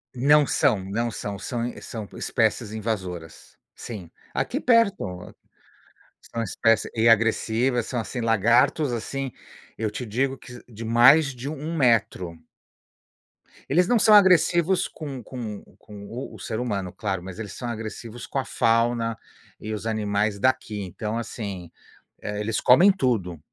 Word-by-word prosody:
Não 145 +4 +5
são, 105 - +2
não 115 +4 -1
são, 100 -2 -5
são 120 -1 -3
são 110 -3 -7
espécies 105 - 0
invasoras. 95 -7 -5 0.2
Sim. 100 -8 -8 0.2
Aqui - - -2
perto, 200 - +1 0.9
são 115 - -5
espéci 115 +1 +1
e 115 +1 +4
agressivas, 115 +2 +2
são, 125 - -3
assim, 120 +2 -4
lagartos, 115 +5 +3
assim, 135 +4 -3 0.5
eu 110 -2 -2
te 125 +3 -5
digo 130 +5 -1
que 125 -1 -12
de 115 +1 -7
mais 135 +5 +6
de 130 +4 -5
1 155 +2 -5
metro. 105 - +1 1.3
Eles 175 +6 +3
não 240 -2 +3
são 215 - +6
agressivos 180 -2 +5
com 140 -6 -7
com 110 -5 -6 0.2
com 100 -1 -12
o 120 -1 -7
o - - -12
ser 110 +4 -4
humano, 100 -7 -2
claro, 95 -4 -3
mas 95 +2 -9
eles 105 -3 -6
são 120 - -6
agressivos 115 +1 -7
com 140 - -2
a 130 - -3
fauna 115 -1 +1 0.4
e 110 0 -5
os 105 +1 -5
animais 105 -1 0
daqui. 120 -3 0
Então, 105 +4 -4
assim, 100 -7 -6 0.5
eh, 105 0 -4
eles 110 +1 -1
comem 175 +11 +7
tudo 110 - -1
115 Hz, 145 wpm, -24 LUFS, 105-130 Hz, 1.3 s, comem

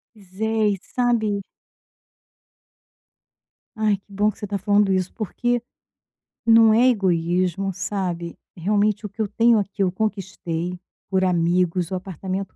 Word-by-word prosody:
Pois 195 -2 -17
é 220 -1 +2
e 200 - -2
sabe 230 -5 0 2.4
Ai, 215 -2 +2
que 200 +1 -22
bom 205 +2 +2
que - - -15
você - - -7
está 200 0 -2
falando 205 0 +3
isso, 185 -1 0
porque 240 +3 -1 0.8
não 225 -1 +7
é 240 +3 +5
egoísmo, 185 -3 +1
sabe, 175 -3 -3 0.2
realmente 205 +4 +1
o - - -4
que 205 +3 -6
eu 215 - +1
tenho 230 +2 +4
aqui, 200 0 -2
eu 185 - +1
conquistei 180 -4 -3 0.3
por 190 -1 +1
amigos, 175 0 +1
o - - -1
apartamento 190 +1 -5
195 Hz, 140 wpm, -23 LUFS, 185-215 Hz, 2.4 s, não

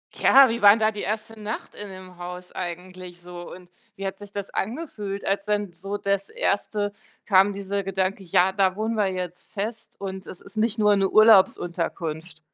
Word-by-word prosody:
Ja, 270 -1 +7
wie 235 +1 -2
war 205 0 +9
'n 225 - -1
da 215 0 +3
die 210 - -6
1. 215 +2 -4
Nacht 210 +2 -5
in 205 - -7
dem 185 -1 -11
Haus 180 0 -8
eigentlich 180 0 -7
so 175 0 -9
und 180 -1 -14 0.2
wie 195 - -6
hat 190 - -3
sich 205 0 -12
das 200 -1 -4
angefühlt, 210 -5 -4
als 200 0 0
dann 205 -2 -1
so 195 +4 -5
das 200 -1 -1
1. 205 0 -1 0.3
kam 195 0 +5
dieser 200 0 -3
Gedanke: 190 0 -1
„Ja 185 +1 +3
da 190 -1 +2
wohnen 220 +2 -1
wir 210 -2 +2
jetzt 180 -2 -5
fest 220 +3 -5
und 190 -1 -6
es 180 - -8
ist 200 +2 -11
nicht 220 +1 +1
nur 210 -1 +4
'ne 195 -1 +2
Urlaubsunterkunft.“ 175 -6 +3
195 Hz, 190 wpm, -24 LUFS, 185-210 Hz, 0.3 s, war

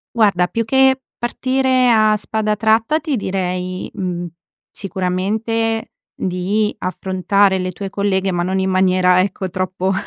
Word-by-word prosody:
Guarda 200 -6 +3
più 230 +4 -2
che, 265 +2 +4 0.2
partire 255 +1 +1
a 215 -2 +4
spada 215 0 -2
tratta 225 +7 +2
ti 310 -4 -2
direi, 185 -3 -3
mhmm, 175 -2 -3 0.4
sicuramente 210 +4 -2 0.2
di 195 +4 -1
affrontare 190 +2 +1
le 185 0 -2
tue 195 +2 -6
colleghe 195 -1 0
ma 175 -1 -1
non 190 +2 -1
in 190 0 0
maniera 185 -1 +3
ecco, 190 0 -3
troppo, 185 +1 -2
195 Hz, 130 wpm, -18 LUFS, 185-225 Hz, 0.4 s, che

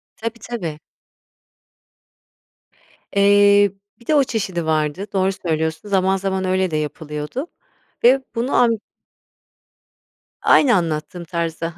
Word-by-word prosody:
Tabii, 230 +1 -5
tabii. 170 -11 -4 2.3
Eee, 200 0 +5 0.3
bir 235 - -20
de 310 - +3
o 285 - +5
çeşidi 190 -9 -3
vardı, 155 +4 -1
doğru 190 0 +2
söylüyorsun. 160 +1 -3
Zaman 190 -1 +2
zaman 190 0 -2
öyle 185 -1 0
de 155 - 0
yapılıyordu. 150 - -5 0.6
Ve 260 +3 +5
bunu 240 +4 -1
am 240 -1 +5 1.7
Aynı 255 -6 +5
anlattığım 165 0 -2
tarzda, 165 0 -4
190 Hz, 105 wpm, -20 LUFS, 160-210 Hz, 2.3 s, Eee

